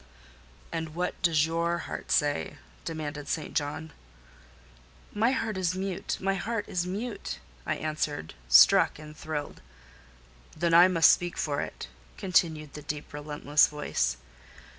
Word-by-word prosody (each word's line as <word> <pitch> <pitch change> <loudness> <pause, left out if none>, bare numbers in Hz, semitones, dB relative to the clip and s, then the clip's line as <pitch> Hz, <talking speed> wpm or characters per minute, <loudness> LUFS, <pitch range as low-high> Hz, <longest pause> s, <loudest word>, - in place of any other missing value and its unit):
"And 160 -1 -4
what 180 +1 -3
does 160 -4 +3
your 170 +1 0
heart - - -6
say?" 145 0 +1 0.3
demanded 150 -3 -5
St. 155 0 -3
John. 150 +1 -2 1.2
"My 220 +3 +3
heart 225 -6 -2
is 185 -1 0
mute,—my 190 0 -2
heart 215 +2 -2
is 180 0 -2
mute," 205 - -4 0.3
I - - +1
answered, 150 - -3 0.2
struck 65 0 +7
and 150 0 -11
thrilled. 155 -2 -5 1.0
"Then 170 +1 +1
I 175 +2 +9
must 170 -3 +6
speak 175 0 -1
for 145 -2 -1
it," - - -6 0.3
continued 160 -5 +1
the 150 - -8
deep, 150 0 -6
relentless 145 0 +2
voice. 65 - -1
160 Hz, 130 wpm, -28 LUFS, 150-180 Hz, 1.2 s, I